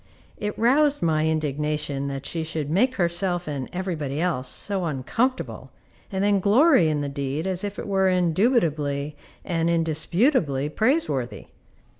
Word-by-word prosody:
It 210 0 -3
roused 285 +4 +3
my 155 -1 +2
indignation 150 -2 -1
that 135 0 -5
she 165 -1 -2
should 155 -2 -4
make 255 +9 +2
herself 175 0 0
and 140 -4 -4
every 185 0 -3
body 145 -2 -4
else 160 -8 -1
so 195 +3 -2
uncomfortable, 195 - -2 0.4
and 190 0 -1
then 205 -1 +3
glory 210 - +5
in 150 -1 0
the 145 - -2
deed 140 +3 -3
as 190 -1 -1
if 205 0 -4
it - - -5
were 190 -1 +2
indubitably 165 - +1 0.3
and 165 -2 0
indisputably 165 - +1
praiseworthy. 185 - -1
170 Hz, 145 wpm, -24 LUFS, 150-200 Hz, 0.4 s, glory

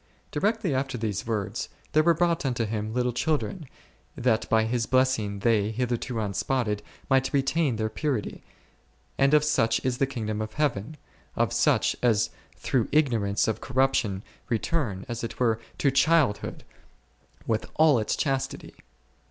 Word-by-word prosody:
Directly 205 +1 0
after 135 -1 -1
these 110 -2 -3
words, 105 -4 -2 0.2
there 155 - +5
were 170 +1 +4
brought 170 -3 +1
unto 125 -4 0
Him 110 0 -3
little 125 +1 0
children, 155 +4 -1 0.5
that 115 -3 +1
by 110 -1 +4
His 115 0 -1
blessing, 130 -6 +1
they, 105 -2 +2
hitherto 120 +1 -2
unspotted, 105 +1 -1 0.3
might 135 -1 +2
retain 140 0 +1
their 110 0 -1
purity; 115 -1 -3 0.8
and 140 +2 +5
of 150 - +5
such 115 -7 +2
is 125 -1 0
the 135 - +2
kingdom 110 -5 -3
of 110 0 -5
Heaven, 145 -1 -1 0.4
of - - +1
such - - +2
as 115 -4 +2 0.3
through 125 -4 0
ignorance 115 -9 +2
of 110 - -1
corruption 130 -7 +1 0.3
return, 115 - -1
as 120 -1 -5
it 115 - -5
were, 115 -3 +2 0.2
to 140 - +2
childhood 140 -4 +2 0.8
with 110 -1 -1
all 155 -5 +5
its 110 - -1
chastity. 135 -2 -2
125 Hz, 145 wpm, -26 LUFS, 110-140 Hz, 0.8 s, there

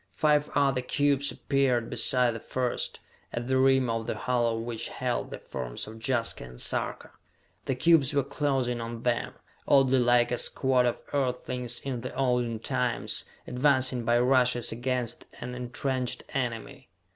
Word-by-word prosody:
Five 150 -1 +2
other 135 -3 +2
cubes 140 +2 +1
appeared 130 -4 0
beside 125 -3 +3
the 115 - -6
first, 125 +2 -2 0.3
at 120 0 -4
the 130 0 +2
rim 135 -1 +4
of 115 0 -2
the - - -2
hollow 120 -3 0
which 115 0 -4
held - - -2
the - - -6
forms - - -5
of 110 +1 -10
Jaska 120 -3 0
and 60 0 -11
Sarka. - - -1 0.5
The 135 - 0
cubes 145 0 +4
were 140 -1 +2
closing 130 -4 -1
on 115 0 -6
them, 120 -1 -1 0.3
oddly 135 -2 +5
like 120 0 +3
a 125 - +1
squad 130 -2 +3
of 120 - -2
Earthlings 125 -2 -2
in 130 -3 -4
the 125 - -6
olden 125 -3 +1
times, 125 0 -1 0.2
advancing 130 -2 +2
by 120 +1 +3
rushes 125 -1 +3
against 120 0 -2
an 125 +1 -6
entrenched 125 +1 -3
enemy! 120 -8 -4
125 Hz, 155 wpm, -28 LUFS, 120-135 Hz, 0.5 s, oddly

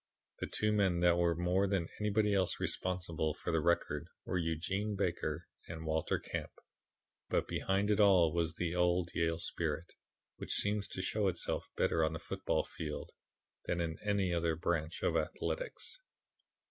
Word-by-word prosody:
The - - -2
two 105 0 +1
men 95 -5 +2
that 85 0 +5
were 85 -1 +3
more 90 +3 +2
than 95 -4 0
anybody 105 0 +2
else 95 -2 +1
responsible 85 -4 -1
for - - -3
the 80 - +3
record 85 +2 +1 0.2
were 90 - 0
Eugene 95 +6 -1
Baker 85 -4 -1 0.2
and 80 -1 -6
Walter 80 0 +1
Camp, - - -4 0.8
but - - +1
behind 100 +2 +1
it 105 - +2
all 90 -6 +6
was 85 -1 0
the 85 -1 -1
old 90 0 +2
Yale 85 -1 +1
spirit, 80 0 -2 0.4
which - - -3
seems 100 -1 +1
to 95 - -4
show 105 +1 +1
itself 90 -2 -2
better 80 - +3
on 80 +1 +1
the 80 - -4
football - - -1
field 75 -2 -5 0.5
than 90 - 0
in 80 -2 -2
any 100 -4 +1
other 85 -1 +1
branch 85 -1 -1
of - - +2
athletics." - - -2
85 Hz, 160 wpm, -34 LUFS, 80-100 Hz, 0.8 s, all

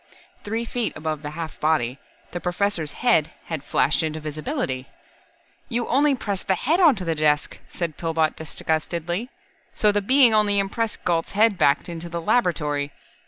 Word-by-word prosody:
Three 225 +3 -2
feet 235 0 -2
above 155 -1 -3
the 145 - -5
half 165 -2 -6
body, 140 -5 +1 0.3
the 175 - -4
Professor's 180 -3 -1 0.2
head 165 -11 +4 0.2
had 160 -4 -4
flashed 145 0 +2
into 155 -1 -2
visibility. 145 -4 -3 0.8
"You 240 -1 -1
only 280 +2 +3
pressed 200 -6 -4
the 190 - +3
head 315 - +1
onto 275 - +4
the 165 - +1
desk," 150 -1 +1
said 170 -4 -4
Pillbot 160 -2 0
disgustedly, 170 +6 -2 0.5
"so 210 - +4
the 205 0 +1
Being 255 +2 +5
only 210 -1 +4
impressed 210 +3 -1
Galt's 170 -1 0
head 215 +1 +4
back 145 -5 +2
into 170 0 -6
the 170 0 -3
laboratory. 150 -8 0
170 Hz, 160 wpm, -23 LUFS, 155-215 Hz, 0.8 s, Being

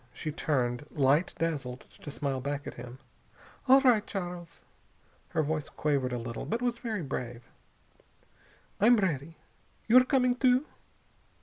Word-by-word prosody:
She 155 - -4
turned, 135 -4 -1
light 145 +4 +2
dazzled, 140 -6 -2
to - - -12
smile 140 -2 -2
back 145 +2 -3
at - - -6
him. 120 +1 -9 0.7
"All 265 +1 +7
right, 245 -6 +4
Charles." 175 -4 -6 0.7
Her 160 - 0
voice 155 0 -2
quavered 140 -4 0
a 125 - -1
little, 115 0 -5
but 230 - -2
it 250 - -2
was 240 -1 -1
very 220 -7 -3
brave. 125 -3 -5 1.4
"I'm 235 +4 +6
ready. 165 -5 -1 0.5
You're 250 +3 +7
coming, 255 -2 +3
too?" 255 +2 +3
155 Hz, 140 wpm, -29 LUFS, -, 1.4 s, All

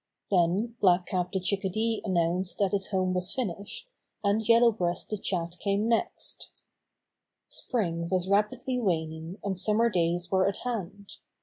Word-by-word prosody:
Then 195 +6 +2
Black 180 -2 +4
Cap 180 -1 -2
the 190 - 0
Chickadee 200 +4 -1
announced 180 -1 0
that 200 -2 +1
his 195 -2 0
home 185 -1 0
was 180 0 -1
finished, 205 - -4 0.4
and 205 +2 +2
Yellow 235 0 +7
Breast 175 -4 -2
the 215 - -1
Chat 175 -3 -3
came 200 +2 0
next. 230 -1 -2 1.0
Spring 170 -8 -2
was 185 -1 0
rapidly 210 +5 +1
waning 160 -3 -2
and 200 -1 -1
summer 215 +5 +2
days 175 -1 0
were 190 0 +3
at 195 - -1
hand. 205 -4 -5
190 Hz, 145 wpm, -28 LUFS, 175-210 Hz, 1.0 s, Yellow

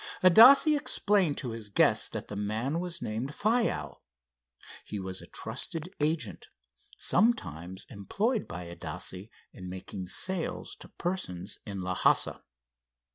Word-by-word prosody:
Adasse 255 - +8
explained 200 - +2
to 125 - -4
his 110 -2 -6
guest 100 - +3
that - - -6
the 105 - -7
man 110 +9 -2
was 175 -1 -4
named 115 +7 -4
Faiow. 225 +2 0 0.8
He 105 - -6
was 95 -1 -5
a - - -12
trusted 165 +3 -3
agent, 155 +2 -1 0.5
sometimes 95 - 0
employed 210 - -2
by 90 0 -7
Adasse 85 +4 -5 0.2
in 90 -1 -9
making 95 0 -7
sales 185 - 0
to - - -11
persons 100 - -4
in 100 -2 -5
Lhassa. 90 0 +1
115 Hz, 125 wpm, -29 LUFS, -, 0.8 s, Adasse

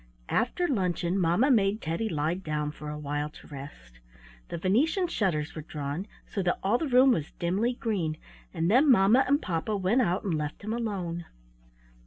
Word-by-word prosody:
After 300 +10 +1
luncheon 185 - 0
mamma 180 - +3
made 205 -3 +3
Teddy 170 +5 -2
lie 155 -1 0
down 155 -5 -3
for 150 0 -8
a 150 - -5
while 145 0 -3
to - - -15
rest. 100 - -11 0.5
The - - -4
Venetian 260 - +2
shutters 175 - -1
were 155 - -6
drawn, 150 +4 -5 0.2
so 200 - -3
that 180 -1 +1
all 210 +6 +2
the 320 - -1
room 260 +1 +6
was 160 -10 -1
dimly 195 +8 0
green, 190 -10 -2 0.3
and 165 +3 0
then 270 +6 +5
mamma 230 +2 +6
and 285 +2 +3
papa 185 - -2
went 200 +7 +2
out 185 -4 0
and 195 -5 -1
left 150 +3 -3
him 215 +2 -2
alone. 185 -8 -3
185 Hz, 180 wpm, -28 LUFS, 155-225 Hz, 0.5 s, room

